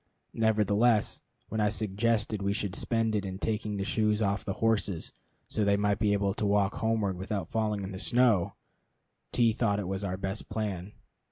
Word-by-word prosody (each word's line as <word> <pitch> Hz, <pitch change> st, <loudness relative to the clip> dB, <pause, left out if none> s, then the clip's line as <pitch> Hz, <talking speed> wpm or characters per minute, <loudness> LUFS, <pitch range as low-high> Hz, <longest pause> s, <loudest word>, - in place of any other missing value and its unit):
Nevertheless, 110 Hz, 0 st, +2 dB, 0.3 s
when 110 Hz, 0 st, -1 dB
I 105 Hz, -, +3 dB
suggested 105 Hz, +1 st, 0 dB
we 100 Hz, 0 st, +1 dB
should 100 Hz, -2 st, -2 dB
spend 115 Hz, -1 st, 0 dB
it 105 Hz, -, 0 dB
in 95 Hz, -1 st, -4 dB
taking 105 Hz, 0 st, -2 dB
the 100 Hz, -, -2 dB
shoes 105 Hz, -1 st, +1 dB
off 100 Hz, -1 st, 0 dB
the 95 Hz, -, -2 dB
horses, 105 Hz, -6 st, 0 dB, 0.3 s
so 110 Hz, -, -1 dB
they 100 Hz, 0 st, +3 dB
might 105 Hz, 0 st, +1 dB
be 105 Hz, -2 st, +3 dB
able 100 Hz, -1 st, +1 dB
to 105 Hz, -, -2 dB
walk 100 Hz, 0 st, +2 dB
homeward 110 Hz, -4 st, 0 dB
without 100 Hz, +2 st, -4 dB
falling 105 Hz, -2 st, 0 dB
in 95 Hz, -, -5 dB
the 95 Hz, -, -6 dB
snow, 115 Hz, -6 st, +3 dB, 0.8 s
T 115 Hz, -2 st, +3 dB
thought 105 Hz, -3 st, +1 dB
it 95 Hz, 0 st, -3 dB
our 95 Hz, -2 st, -2 dB
best 95 Hz, +2 st, -4 dB
plan. 105 Hz, -3 st, -3 dB
105 Hz, 180 wpm, -29 LUFS, 100-110 Hz, 0.8 s, I